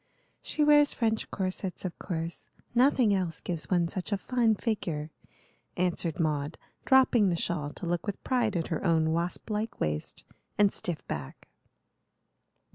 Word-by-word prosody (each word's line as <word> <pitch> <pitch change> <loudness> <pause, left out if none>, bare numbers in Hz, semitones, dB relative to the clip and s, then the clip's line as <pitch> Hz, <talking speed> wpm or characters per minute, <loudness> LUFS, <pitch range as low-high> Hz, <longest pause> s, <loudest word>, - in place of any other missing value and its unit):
"She 305 - 0
wears 295 -1 +5
French 225 -2 0
corsets, 190 -1 -3
of 180 - -5
course. 165 -1 -4 0.2
Nothing 245 -3 +4
else 180 -4 -1
gives 170 -3 -4
one 175 -2 +2
such 185 +3 -4
a 200 - +2
fine 230 0 +2
figure," 170 -9 -2 0.7
answered 175 -3 0
Maud, 150 -1 -1 0.3
dropping 255 -6 +5
the 175 - +1
shawl 160 -3 -1
to - - -7
look 175 +2 -2
with 205 - -4
pride 240 -6 +1
at 165 -2 -1
her 165 - -2
own 160 -3 +3
wasp 170 +5 -2
like 215 +2 -2
waist 75 0 -3 0.3
and 205 -1 +4
stiff 175 -4 -3
back. 70 -2 -6
185 Hz, 150 wpm, -29 LUFS, 165-220 Hz, 0.7 s, wears